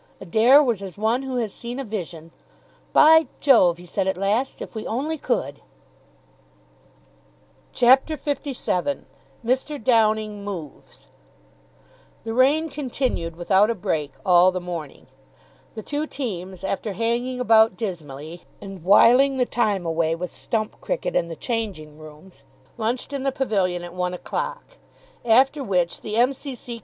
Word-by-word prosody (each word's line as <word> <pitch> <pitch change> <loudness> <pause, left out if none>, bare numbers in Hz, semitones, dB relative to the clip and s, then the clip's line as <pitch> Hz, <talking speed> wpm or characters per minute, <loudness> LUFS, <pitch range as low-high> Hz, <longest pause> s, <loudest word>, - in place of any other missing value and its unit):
Adair 230 - +5
was 235 -7 -1
as 190 -2 -8
one 225 +4 +1
who 265 -1 -5
has 225 -5 -2
seen 240 +1 -7
a - - -3
vision. 175 -7 -6 0.6
"By 320 0 +6
Jove," 185 - +5
he 175 - -13
said 190 +2 -2
at 190 - -1
last, 210 +7 -1
"if - - -8
we 220 -1 -6
only 285 +8 -2
could!" 145 - -2 2.1
CHAPTER 265 +5 +4
LVII 280 -4 -3 0.4
MR. 260 +2 -1
DOWNING 215 -3 +2
MOVES 165 - -9 1.2
The 225 0 -4
rain 285 +6 +3
continued 255 - -3
without 190 +5 +3
a 230 - 0
break 155 -6 -2
all 180 0 +6
the 185 - -3
morning. 170 -5 -7 0.7
The 220 - -6
two 295 +1 -3
teams, 190 - -6
after 195 +2 -3
hanging 235 +4 -1
about 225 -4 +4
dismally, 165 -5 -6 0.2
and 195 -4 -10
whiling 250 +8 +5
the 250 - +2
time 210 -7 0
away 165 0 0
with 180 +1 -6
stump 220 -3 -3
cricket - - -3
in 170 - +1
the 165 - -7
changing 185 - -4
rooms, 155 +4 -13 0.3
lunched 240 +5 -3
in 280 - -3
the 270 0 0
pavilion 195 -10 -1
at 175 0 -9
one 180 0 -2
o'clock. - - -5 0.5
After 265 +5 +3
which 180 -6 -1
the 215 - -5
M.C.C. 250 -1 -1
220 Hz, 140 wpm, -23 LUFS, 180-255 Hz, 2.1 s, By